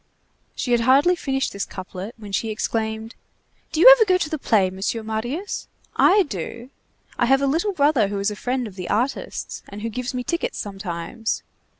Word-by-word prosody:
She 250 - -2
had 240 - +4
hardly 275 +9 +5
finished 270 -5 -2
this 200 0 -2
couplet, 190 +3 -7
when 210 -2 -10
she 210 +3 -1
exclaimed:— 220 +1 -2 0.6
"Do 315 - -2
you 355 - +8
ever 475 - +4
go 370 -3 +3
to 315 - -2
the 310 - -2
play, 195 -7 +2
Monsieur 195 +4 -3
Marius? 240 - -4 0.3
I 400 +2 +5
do. 235 - -6 0.5
I 240 - +3
have 270 +2 +4
a - - +4
little 330 +9 +1
brother 285 - +3
who 200 0 -3
is 200 +1 0
a - - -5
friend 250 +3 -2
of 210 - -8
the 180 - -5
artists, 245 +6 -2
and 205 +1 -8
who 230 - -1
gives 250 +3 -4
me 250 - -2
tickets 350 - -2
sometimes. 195 +2 -4
235 Hz, 195 wpm, -23 LUFS, 205-280 Hz, 0.6 s, you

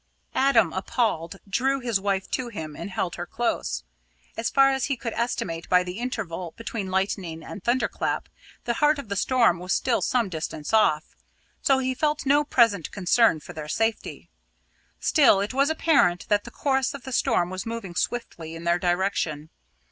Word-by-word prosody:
Adam, 230 -10 +3
appalled, 190 -3 -1
drew 265 +7 +1
his 235 -5 0
wife 195 -1 -1
to 255 - -1
him 160 -10 -7
and 200 - -6
held 185 -2 -3
her 175 0 -5
close. 240 +5 -2 0.5
As 230 0 -1
far 275 0 +5
as 265 -2 0
he 275 -2 -1
could 230 -1 -4
estimate 170 -8 -3
by 180 0 +5
the 180 +3 -6
interval 185 -9 -4
between 230 -4 -4
lightning 185 -4 -2
and 200 - -9
thunder 240 0 +2
clap, - - -2 0.4
the 235 - 0
heart 295 +4 +3
of 280 -7 -8
the 200 - -2
storm 230 -5 +3
was 180 +2 -2
still 250 -3 +1
some 240 -4 +1
distance 160 -2 -5
off, 160 -8 +2 0.5
so 270 - +4
he 260 0 0
felt 295 +3 -1
no 290 +2 +4
present 230 - +3
concern 200 -1 +3
for - - -10
their 155 -1 -7
safety. 225 +5 -2 0.7
Still, 280 -10 +5
it 200 +5 -2
was 275 +2 +3
apparent 285 - +2
that 205 0 +2
the - - -7
course 270 -1 0
of 275 - -9
the 265 - -6
storm 175 -6 +1
was 185 +3 -5
moving 225 -6 -5
swiftly 170 -6 -3
in 165 - -8
their 170 +1 +2
direction. 175 -4 -1
210 Hz, 180 wpm, -25 LUFS, 175-255 Hz, 0.7 s, far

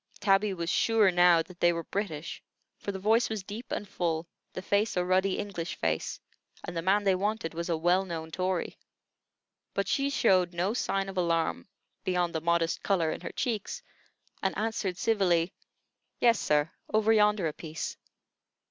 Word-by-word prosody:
Tabby 195 +1 +3
was 170 -3 -4
sure 220 -4 +4
now 175 -2 +5
that 180 +1 -15
they 175 - +5
were 170 -1 -3
British; 170 -5 -4 0.4
for 200 - -4
the 195 - -5
voice 220 +5 +2
was 215 -3 -3
deep 210 +5 -8
and 205 - -3
full, 170 -3 -2 0.2
the 185 - -6
face 205 +1 +1
a 180 - +1
ruddy 185 +1 +2
English 180 -4 -4
face, - - -2 0.4
and - - -6
the 165 - -1
man 195 +4 +2
they 195 -1 +4
wanted 200 -2 -1
was 170 +1 -4
a 165 - +1
well 175 +4 +3
known 165 -3 -6
Tory. 185 0 -2 1.0
But - - 0
she 275 -1 +1
showed 185 -9 +3
no 185 +5 0
sign 195 -5 -1
of 195 -1 -7
alarm, 165 -1 0 0.4
beyond 180 -1 0
the 160 - -2
modest 170 0 +1
color 170 -6 +1
in - - -5
her - - -5
cheeks, 220 -5 -3 0.6
and 190 - -1
answered 210 -4 -2
civilly: 190 -6 +2 0.7
"Yes, 235 -1 +4
sir, 150 +1 +1 0.2
over 215 +1 +4
yonder 210 -3 +3
a 155 - -3
piece." 160 0 -5
185 Hz, 175 wpm, -29 LUFS, 170-205 Hz, 1.0 s, now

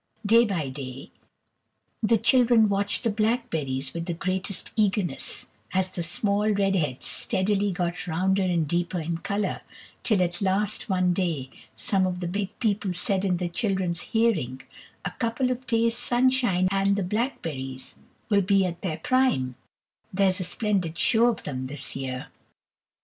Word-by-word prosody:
Day 230 +3 +6
by 170 -10 -2
day 130 -1 -8 0.9
the 225 +1 +3
children 235 -1 +4
watched 200 +3 +1
the 230 - +1
blackberries 205 - -1
with 170 +1 -5
the 170 - -2
greatest 190 +2 -2
eagerness, 205 -4 0 0.3
as 185 0 +1
the 180 - -4
small 200 +5 +1
red 195 -2 +2
heads 150 -8 -1
steadily 200 0 0
got 180 0 -3
rounder 190 +4 +1
and 175 -4 +1
deeper 175 +2 -1
in 165 +1 -3
colour, 200 +1 -2 0.4
till 205 -5 +2
at 175 +2 -2
last 195 +2 +1
one 185 -2 +2
day 165 -8 -2 0.2
some 190 -2 +1
of 180 -1 -3
the 175 - -3
big 200 +3 -3
people 205 -4 0
said 190 +2 +1
in 185 -3 +1
the 180 0 -2
children's 180 -2 0
hearing, 170 - 0 0.4
"a - - -1
couple 250 +2 -1
of 255 +1 -5
days' 230 0 +2
sunshine 245 -7 +2
and 195 0 +2
the 200 - -1
blackberries 165 - -3 0.4
will 200 -1 +5
be 195 0 +3
at 175 -1 -4
their 160 -5 -2
prime; 175 - +1 0.6
there's 190 0 +2
a - - -1
splendid 185 -5 -1
show 230 +6 +4
of 235 -4 -1
them 130 -3 -4
this 135 0 -3
year." 130 -1 -5
190 Hz, 155 wpm, -26 LUFS, 170-215 Hz, 0.9 s, Day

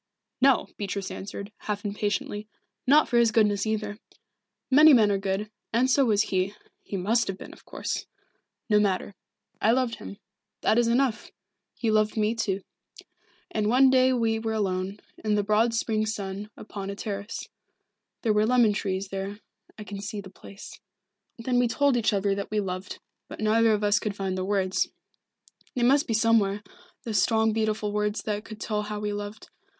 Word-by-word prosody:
"No," 265 -2 +5
Beatrice 200 -1 -3
answered, 200 +1 -7
half 210 0 -4
impatiently. 205 +1 -2 0.4
"Not 295 +4 +6
for 240 - +1
his 235 -1 +5
goodness 210 -2 +2
either. 210 -1 -2 0.7
Many 300 +3 +8
men 215 -4 +4
are 200 - +1
good, 195 +2 -2 0.2
and 250 +3 +2
so 275 +1 +4
was 210 -3 +3
he 190 +1 -1 0.3
he 200 - -5
must 225 +6 +1
have 195 - -3
been, - - -10
of - - -18
course. - - -4 0.6
No 210 -2 +4
matter. 200 -1 0 0.5
I 220 - +4
loved 250 -1 +1
him. 200 - -9 0.4
That 225 - +3
is 240 - +3
enough. 245 0 +1 0.5
He 230 -3 0
loved 215 0 +2
me, 215 +1 +2
too. 200 -4 -2 0.9
And 215 -1 0
one 260 +3 +5
day 260 0 +5
we 225 -3 +1
were 220 0 -2
alone, 195 -2 -1 0.3
in 215 -1 +1
the 205 - +1
broad 215 +3 +3
spring 220 -1 0
sun, 205 -1 -4
upon 200 -2 -7
a 200 - -4
terrace. 200 0 -5 0.8
There 220 -3 +3
were 210 +1 +3
lemon 240 -3 +4
trees 195 -1 -2
there 195 +1 -4 0.4
I 210 - -7
can 200 -1 -7
see 210 +1 -5
the 190 -2 -9
place. 200 +1 -12 0.6
Then 245 +1 0
we 245 - +3
told 280 +3 +2
each 230 -3 +2
other 200 -1 +1
that 200 0 -4
we 215 - 0
loved 185 -1 -4 0.3
but - - -10
neither 220 +1 +3
of 210 -1 +1
us 205 0 +3
could 210 -2 -3
find 195 -2 -2
the 185 - -2
words 190 -2 +1 0.9
they 245 - 0
must 275 +4 +4
be 225 - 0
somewhere, 210 -3 +2 0.4
those 215 -4 +1
strong 220 0 +2
beautiful 215 -1 0
words 210 0 -1
that 210 -1 -2
could 215 -1 -10
tell 210 -1 -1
how 210 0 -5
we 210 0 -2
loved. 205 +1 -7
210 Hz, 180 wpm, -26 LUFS, 200-230 Hz, 0.9 s, Many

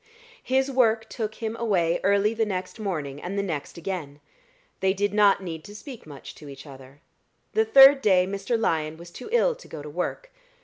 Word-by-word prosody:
His 265 +1 0
work 225 -4 +2
took 220 -3 -4
him 225 -1 -4
away 180 -8 +1
early 200 +2 +3
the 225 0 0
next 190 +1 -4
morning 150 -9 -4
and 190 +3 -5
the 200 - 0
next 160 -6 -5
again. 165 -5 -5 0.6
They 190 0 +2
did 205 +1 -1
not 205 -2 +4
need 165 -3 -6
to 205 0 -11
speak 245 - -10
much 135 -2 -10
to 150 - -10
each 140 +1 -11
other. 135 0 -14 0.5
The 440 0 +3
third 275 -8 +8
day 185 -5 +4
Mr. 200 +5 -2
Lyon 160 -6 -1
was 170 +1 -12
too 250 - -9
ill 485 +1 +3
to - - -15
go 150 -2 -8
to 150 - -8
work. 180 - -4
195 Hz, 195 wpm, -25 LUFS, 160-225 Hz, 0.6 s, third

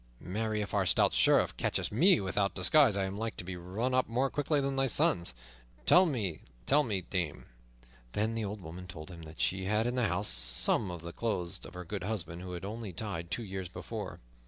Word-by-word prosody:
Marry, 105 +3 -2
if 105 - -5
our 100 -3 +2
stout - - +4
Sheriff - - +4
catcheth - - 0
me 170 - +5
without 100 +1 0
disguise, 110 +3 +5
I 100 - +1
am 95 +2 -5
like 115 0 -3
to - - -5
be 90 +1 -5
run 95 +9 -3
up 130 0 +2
more 130 +4 +1
quickly 145 +1 +1
than 135 0 -1
thy 135 0 +2
sons, 85 - +3 0.5
let 185 0 +7
me 105 - -2 0.2
tell 150 - +4
thee, 100 -4 0
dame." 90 -4 -3 0.7
Then 110 +2 0
the 115 -1 -2
old 105 0 -5
woman 90 +2 -8
told 80 0 -9
him 85 -2 -10
that 80 0 -11
she 95 0 0
had 105 +3 +1
in 120 - 0
the 125 -3 +2
house 95 +3 0
some - - +3
of 85 -2 -6
the 85 0 -7
clothes 90 -7 -2
of 90 - -14
her 90 0 -6
good 95 +3 -4
husband, 90 -5 -3
who 90 0 -6
had 90 - -6
died - - -4
only 110 -3 -6 0.4
two 115 +7 -2
years 95 -3 -5
before. - - -6
100 Hz, 220 wpm, -31 LUFS, 90-115 Hz, 0.7 s, let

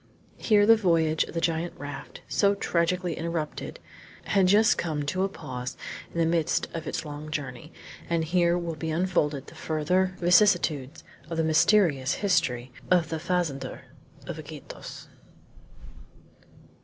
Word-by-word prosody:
Here 210 -2 +4
the 225 +1 +8
voyage 165 -6 +2
of - - -11
the - - +1
giant 165 +1 -1
raft, 145 0 -8
so 200 -1 +2
tragically 180 -1 0
interrupted, 165 -2 -4 0.4
had 195 -2 +3
just 215 +4 +5
come 155 -4 -2
to 185 +6 -1
a 195 - 0
pause 130 -8 -6 0.3
in - - -8
the 165 - +4
midst 165 -1 +1
of 165 -1 -5
its 165 - -3
long 150 +1 -7
journey, 145 -1 -5 0.4
and 165 -1 +1
here 175 +1 +2
will 170 -1 -3
be 160 +1 -4
unfolded 155 -5 0
the - - -13
further 180 +4 0
vicissitudes 175 -6 +3 0.3
of 165 - -4
the 165 - +2
mysterious 160 -4 +3
history 130 -11 0 0.2
of 175 -3 +3
the 160 - -3
fazender 170 -5 -2 0.4
of - - -6
Iquitos. - - -9
165 Hz, 145 wpm, -27 LUFS, 155-180 Hz, 0.4 s, the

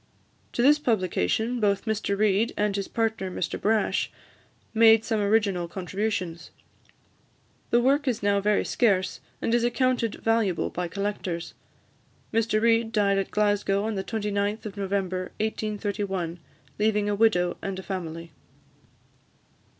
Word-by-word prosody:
To 240 - +1
this 295 +3 +6
publication, 220 - 0
both 200 -1 +1
Mr 215 -2 -1
Reid, 210 +2 +2
and 205 -1 +1
his 200 -1 -2
partner, 225 -4 -1
Mr 180 - -3
Brash, 215 +1 +1 0.6
made 225 0 +6
some 220 -3 0
original 200 -4 +1
contributions. 185 -1 -3 1.2
The 240 - +4
work 280 +3 +2
is 235 -5 -1
now 200 0 +2
very 210 +1 +2
scarce, 195 -6 +1 0.2
and 230 - +1
is 240 0 +3
accounted 245 -2 +1
valuable 225 -6 0
by 180 0 -3
collectors. 190 -2 -4 0.8
Mr 225 -1 +2
Reid 230 0 +2
died 200 -3 +2
at 195 - -2
Glasgow, 205 -1 +1
on 220 +1 -1
the 190 -2 -2
29th 210 -1 -2
of 210 - -6
November 190 -2 -2
1831, 205 -5 -2 0.4
leaving 210 -1 +2
a 205 - +1
widow 200 -5 +2
and 195 -1 -4
a 190 - -6
family. 165 -4 -5
205 Hz, 135 wpm, -26 LUFS, 190-225 Hz, 1.2 s, this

